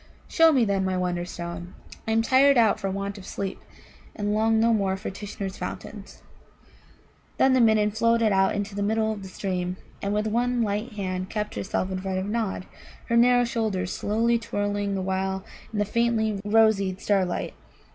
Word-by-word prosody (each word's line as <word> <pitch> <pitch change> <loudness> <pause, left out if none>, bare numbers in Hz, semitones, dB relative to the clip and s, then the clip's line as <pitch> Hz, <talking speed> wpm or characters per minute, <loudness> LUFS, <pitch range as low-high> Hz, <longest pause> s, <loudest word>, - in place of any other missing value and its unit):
"Show 330 -1 +5
me, 260 -6 +3
then, 200 -2 0
my 190 -1 0
Wonderstone. 175 -1 -4 0.3
I - - 0
am 225 0 +3
tired 270 +3 +5
out 220 -2 +4
for 195 -2 -2
want 200 +1 -4
of 185 - -11
sleep, 195 -1 -4 0.6
and 205 -1 -1
long 220 +1 +2
no 230 +1 +4
more 195 -3 +1
for 190 - -5
Tishnar's 200 -1 -6
fountains." - - -8 1.1
Then 265 - +4
the 260 - +4
Midden 215 -2 +4
floated 230 0 +2
out 190 +1 +3
into 205 0 -3
the 205 - -3
middle 220 +1 +1
of 205 - -8
the 190 - -8
stream, 185 -1 -3 0.2
and 200 - -2
with 210 +1 0
one 240 +2 +1
light 210 +3 -2
hand 185 -2 -3
kept 210 -1 -3
herself 190 -1 -2
in 185 - -2
front 190 -1 -2
of 190 - -2
Nod, 210 -3 -2 0.4
her 235 - +2
narrow 245 +1 +5
shoulders 220 -7 -1
slowly 230 +3 +1
twirling 205 -2 -2
the 190 - -2
while 190 0 -2 0.3
in 220 - -5
the 205 - +2
faintly 220 -2 0
rosied 205 -3 +3
starlight. 190 -3 0
205 Hz, 180 wpm, -25 LUFS, 190-225 Hz, 1.1 s, Show